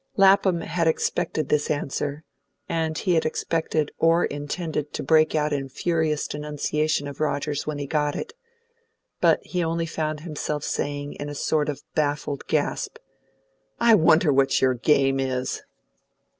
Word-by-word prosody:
Lapham 195 -3 +5
had 165 0 -1
expected 155 -2 0
this 150 -1 +1
answer, 145 0 -2 0.4
and 160 -1 -1
he 180 - +1
had 160 - +3
expected 160 -1 -1
or 165 +1 +4
intended 145 +1 -4
to - - -3
break 155 +2 +4
out 150 -1 +1
in 135 -1 -2
furious 160 0 0
denunciation 150 0 -1
of 140 -1 -8
Rogers 145 -1 -1
when 155 -1 -2
he 145 - -3
got 150 0 0
it; - - -5 0.9
but - - +4
he 180 -1 -1
only 165 0 -1
found 155 -2 -3
himself 150 -2 -4
saying, 145 0 -3
in 145 - -4
a 145 - -6
sort 150 +1 0
of 145 - -5
baffled 145 -2 -1
gasp, - - -1 0.8
"I 235 -1 +6
wonder 160 -4 +5
what 135 0 +3
your 130 -1 +3
game 135 +1 +2
is!" 130 -1 -2
150 Hz, 150 wpm, -24 LUFS, 145-160 Hz, 0.9 s, I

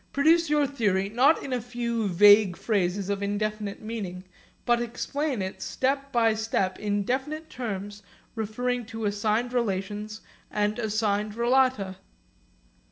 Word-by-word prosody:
Produce 325 +4 +4
your 295 -1 +3
theory, 205 -8 0
not 260 +8 +3
in 265 - -4
a 250 - -1
few 235 -2 -2
vague 205 0 +6
phrases 195 -3 0
of 200 0 -2
indefinite 210 0 -3
meaning, 200 -5 -5 0.4
but 240 -1 +3
explain 250 +1 -2
it 190 - -6
step 275 +1 -1
by 230 -3 +3
step 215 -4 -1
in 205 -1 0
definite 295 +7 -3
terms 205 -4 -5 0.3
referring 245 +3 -2
to 225 -2 -5
assigned 215 +4 0
relations 210 -1 -2 0.3
and 210 +2 -1
assigned 210 -1 0
relata. 235 -5 +2
220 Hz, 130 wpm, -26 LUFS, 205-245 Hz, 0.4 s, vague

